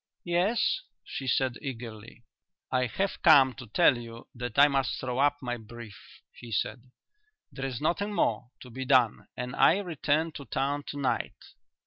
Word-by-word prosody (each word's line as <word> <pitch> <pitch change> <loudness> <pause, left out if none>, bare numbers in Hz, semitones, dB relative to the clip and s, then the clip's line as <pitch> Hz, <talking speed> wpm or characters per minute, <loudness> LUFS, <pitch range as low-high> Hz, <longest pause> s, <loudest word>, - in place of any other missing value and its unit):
"Yes?" 180 - +1 0.2
she 135 - -6
said 130 -1 +1
eagerly. 115 -4 -8 0.5
"I 125 -1 +1
have 195 - -2
come 140 -6 +7
to 130 -2 -10
tell 145 +5 +4
you 115 0 -10
that 120 -2 -6
I 145 +1 +8
must 135 -2 0
throw 125 -1 -3
up 145 +1 +3
my 120 -1 -2
brief," 115 -2 -12
he 120 -1 -12
said. 125 +3 -2 0.6
"There 135 -1 -4
is 125 -3 -5
nothing 200 +7 0
more 125 -10 0
to 125 - -11
be 130 +3 -5
done 130 -4 +3
and 125 +1 -4
I 170 - +5
return 160 -4 0
to 140 -2 -9
town 140 +2 -2
to 145 - -5
night." 140 -2 -1
130 Hz, 165 wpm, -28 LUFS, 120-145 Hz, 0.6 s, I